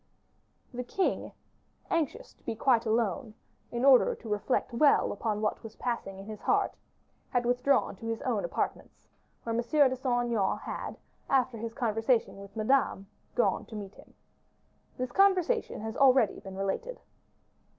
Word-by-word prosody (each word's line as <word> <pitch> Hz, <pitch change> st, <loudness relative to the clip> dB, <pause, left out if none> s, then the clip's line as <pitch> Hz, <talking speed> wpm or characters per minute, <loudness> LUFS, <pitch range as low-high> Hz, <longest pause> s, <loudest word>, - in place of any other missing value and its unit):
The 250 Hz, +1 st, -3 dB
king, 375 Hz, +10 st, -1 dB, 0.6 s
anxious 335 Hz, -, -1 dB
to -, -, -33 dB
be -, -, -3 dB
again 220 Hz, -, -15 dB
quite 240 Hz, -4 st, +4 dB
alone, 220 Hz, +1 st, 0 dB, 0.4 s
in 240 Hz, +2 st, -1 dB
order 265 Hz, -3 st, +6 dB
to 230 Hz, -, -12 dB
reflect 210 Hz, +4 st, 0 dB
well 285 Hz, +4 st, +4 dB
upon 210 Hz, 0 st, -2 dB
what 215 Hz, -, -1 dB
was 220 Hz, -1 st, -10 dB
passing 230 Hz, -6 st, -3 dB
in 195 Hz, -, -9 dB
his 215 Hz, 0 st, -8 dB
heart, -, -, +2 dB, 0.6 s
had 245 Hz, -1 st, 0 dB
withdrawn 245 Hz, -1 st, +2 dB
to 225 Hz, -, -7 dB
his 225 Hz, 0 st, -2 dB
own -, -, 0 dB
apartments, -, -, -4 dB, 0.4 s
where 230 Hz, -, -2 dB
M. 235 Hz, -, +1 dB
de 265 Hz, +1 st, +3 dB
Saint 245 Hz, -2 st, 0 dB
Aignan 200 Hz, -4 st, +1 dB
had, -, -, -6 dB, 0.3 s
after 255 Hz, -4 st, +2 dB
his 230 Hz, +1 st, -5 dB
conversation 225 Hz, -1 st, +1 dB
with 200 Hz, 0 st, -12 dB
Madame, 220 Hz, -3 st, +1 dB, 0.3 s
gone -, -, +2 dB
to 225 Hz, -, -9 dB
meet 205 Hz, -1 st, -7 dB
him. -, -, -18 dB, 0.8 s
This 255 Hz, -1 st, -3 dB
conversation 390 Hz, -, +2 dB
has 220 Hz, 0 st, -5 dB
already 260 Hz, -5 st, +4 dB
been 190 Hz, -1 st, -9 dB
related. 195 Hz, -, -3 dB
240 Hz, 160 wpm, -29 LUFS, 215-265 Hz, 0.8 s, order